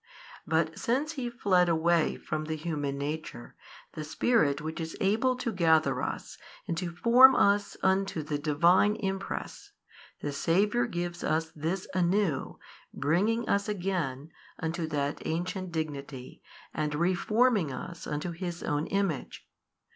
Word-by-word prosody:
But 160 0 0
since 275 +6 0
He 260 -6 -4
fled 185 -7 +2
away 165 0 +2
from 155 0 -4
the 160 0 -3
human 150 -3 -3
nature, 145 - -5 0.4
the 155 - -6
Spirit 150 - +2
which 160 +2 -5
is 160 0 -5
able 225 +6 +2
to 245 -2 -3
gather 160 -5 +3
us - - -5 0.3
and 170 - -1
to 180 - -3
form 250 +6 +7
us 200 0 +2
unto 190 -4 +1
the 145 -1 -3
Divine 170 +7 +4
Impress, 195 - -5 0.5
the 145 - -3
Saviour 205 +11 +1
gives 175 -3 -4
us 160 +1 0
this 165 +5 -3
anew 180 -4 0 0.3
bringing 200 +11 +1
us 200 +1 +1
again 175 -8 -2 0.3
unto 165 0 -3
that 145 -2 -2
ancient 185 +3 -3
Dignity 140 -5 -5 0.3
and 150 -1 -2
reforming 185 - +2
us 170 +6 -7
unto 150 +4 -3
His 170 0 -5
own 150 +1 -1
Image. 195 -7 -2
170 Hz, 135 wpm, -29 LUFS, 155-200 Hz, 0.5 s, form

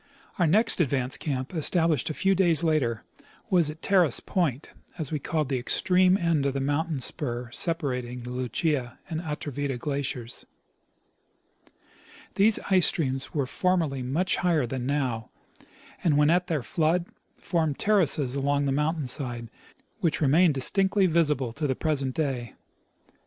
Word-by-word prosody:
105 - - -3
Our 170 - +4
next 210 +3 +3
advance 130 -4 0
camp, 130 0 -4
established 165 -3 +1
a 155 - -4
few 195 0 +2
days 175 -4 +2
later, 135 -9 0 0.5
was 175 -5 +4
at 155 +1 -9
Terrace 180 -9 +3
point, 155 -7 -2 0.3
as' 155 -4 -3
we 155 - -1
called 155 +1 -1
the 130 -2 -1
extreme 185 +8 +3
end 165 -6 +1
of 135 - -1
the 135 - -2
mountain 145 +2 -1
spur 120 -2 -2
separating 125 -6 -1
the 120 +1 -7
Lucia 125 +1 -2
and 160 0 -2
Atrevida 145 -4 -4
glaciers. 130 -3 -4 1.9
These 210 +2 +4
ice 185 -3 +6
streams 135 -3 -2
were 140 -3 +1
formerly 165 -3 0
much 145 +9 0
higher 165 -6 +1
than 125 +1 -4
now, 130 -6 -1 0.7
and 155 -5 +3
when 150 +1 +4
at 180 +1 +2
their 155 -7 -1
flood 165 +7 +1 0.3
formed 160 -5 -1
terraces 155 -10 +2
along 140 +1 0
the 140 - 0
mountain 150 +2 0
side, 120 -3 -4 0.5
which 165 -3 0
remain 160 +4 +4
distinctly 190 +8 +1
visible 150 -8 +1
to 150 +3 -2
the 130 - 0
present 140 -4 -1
day. 135 -6 -2
150 Hz, 150 wpm, -26 LUFS, 130-170 Hz, 1.9 s, ice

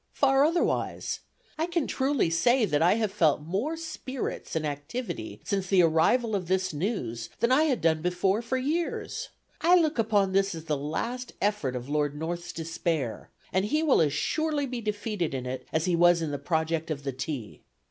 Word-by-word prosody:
Far 270 0 +4
otherwise. 335 +3 0 0.4
I 325 - +1
can 340 -4 0
truly 265 - +1
say 240 +8 +3
that 150 -6 +1
I 175 +5 +5
have 220 -3 0
felt 165 -7 +3
more 210 - -2
spirits 290 - -5
and 160 -1 0
activity 145 - -5
since 195 -2 -1
the 185 -2 +5
arrival 210 +8 +3
of 185 -3 -2
this 185 -1 0
news 135 - -3
than 235 - +2
I 295 +5 +5
had 265 -7 +1
done 160 -1 +2
before 180 +4 +1
for 240 +2 -2
years. 310 +6 -2 0.3
I 350 +2 +6
look 315 -7 +2
upon 205 -3 +2
this 195 -1 +2
as 160 0 -8
the 155 -2 0
last 230 - -3
effort 200 -11 0
of 125 0 -5
Lord 145 0 0
North's 170 +2 -4
despair, 160 -6 -3 0.2
and 190 +1 +2
he 305 +9 +1
will 295 - +4
as 150 -3 +3
surely 300 - 0
be 250 -2 -4
defeated 210 -7 -2
in 130 -1 -4
it, 125 0 -5
as 160 0 +1
he 180 -2 +2
was 175 0 +5
in 155 - -2
the 145 - -3
project 160 +1 -1
of 145 -3 -3
the 135 -1 -3
tea. 130 -4 -5
185 Hz, 190 wpm, -28 LUFS, 155-250 Hz, 0.4 s, I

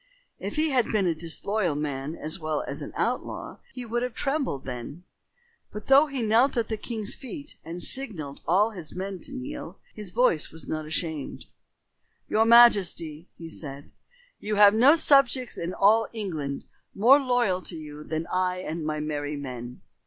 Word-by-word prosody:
If - - -5
he 310 0 +1
had 250 -3 +2
been 210 -3 +2
a 170 - +2
disloyal 170 +2 -1
man 145 0 -3
as 155 +4 -2
well 155 -2 -2
as - - -6
an - - -6
outlaw, - - -3
he 250 -2 -7
would 240 +1 -2
have 250 -2 -3
trembled 275 - -2
then. 125 +6 -7 0.7
But, 210 0 -8
though 275 +3 +6
he 275 -4 -3
knelt 235 +5 +3
at 230 -2 0
the 220 - -2
king's 220 -1 -3
feet 285 +2 -8
and 170 +2 -5
signalled 180 - -1
all 205 +6 +3
his 175 -7 -7
men 190 0 -4
to 275 - -6
kneel, 265 +2 -7 0.2
his 210 -3 -6
voice 175 -6 +2
was 160 0 -9
not 155 -1 -4
ashamed. 155 -2 -3 0.8
"Your 220 +1 +2
majesty," 190 -9 +5
he 165 - -8
said, 145 -3 -8 0.5
"you 210 0 -2
have 205 0 +7
no 255 +8 +6
subjects 275 -5 +3
in 170 +1 -3
all 215 +4 +4
England 160 -11 -4 0.3
more 250 +8 +6
loyal 245 -8 +1
to 180 - -4
you 150 -1 -9
than 160 +1 -3
I 185 0 +1
and 165 -3 -5
my 155 0 -2
merry 150 -1 -3
men. 125 -3 -7
185 Hz, 175 wpm, -26 LUFS, 155-240 Hz, 0.8 s, have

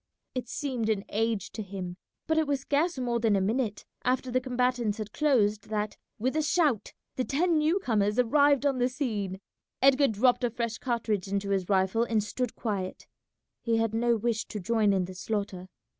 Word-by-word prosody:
It 250 -2 -4
seemed 250 -6 -2
an 210 -2 0
age 220 -2 -1
to 220 - -5
him, 190 -3 -6 0.3
but 320 0 +2
it 315 - +1
was 280 -2 0
scarce 295 +4 +1
more 240 -2 0
than 225 -3 +3
a - - +3
minute 215 +2 -1 0.2
after 255 0 0
the 255 +1 +2
combatants 250 -4 0
had 215 -1 -6
closed 215 -9 +2
that, 210 -1 -2 0.2
with 260 +6 -1
a 310 - +2
shout, 300 - +1 0.3
the 255 - +1
ten 320 +5 +2
new 315 +5 +2
comers 210 - +1
arrived 285 +3 +4
on 275 -3 +2
the 245 +1 +2
scene. 210 -8 -3 0.4
Edgar 275 +1 +5
dropped 245 +3 +2
a 245 - +3
fresh 230 -1 -3
cartridge 225 -6 -1
into 200 0 -2
his 190 -2 0
rifle 190 +3 +2
and 225 -3 +1
stood 245 +3 -3
quiet; 195 -5 -3 0.6
he 230 -1 +1
had 225 -1 0
no 235 +1 +2
wish 230 0 -1
to 210 - -5
join 215 +1 +2
in 190 -2 +1
the 185 - -8
slaughter. 190 -1 -3
230 Hz, 190 wpm, -28 LUFS, 205-260 Hz, 0.6 s, Edgar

